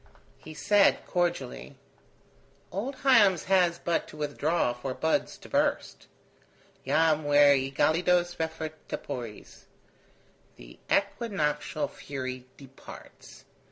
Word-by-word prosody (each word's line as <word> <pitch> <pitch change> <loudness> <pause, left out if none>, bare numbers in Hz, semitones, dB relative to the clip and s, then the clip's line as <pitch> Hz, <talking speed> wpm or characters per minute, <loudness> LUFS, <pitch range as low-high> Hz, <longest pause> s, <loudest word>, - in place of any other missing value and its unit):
He 155 - -11
said, 205 +3 +3
cordially: 170 -6 -2 1.0
"Old 230 +10 -4
Hiems 210 - +5
has 180 -3 +2
but 170 0 -1
to - - -13
withdraw 150 -2 0
for 130 +2 -6
buds 160 0 -1
to - - -14
burst. - - -1 0.8
'Jam 160 -1 +2
ver 145 -1 +5
egelidos 170 +6 +1
refert 160 -1 -3 0.2
tepores.' 120 -6 -7 0.9
The - - -15
equinoctial 180 -8 -1
fury 130 -2 -7
departs. 135 -1 -14
155 Hz, 95 wpm, -28 LUFS, 140-175 Hz, 1.0 s, Hiems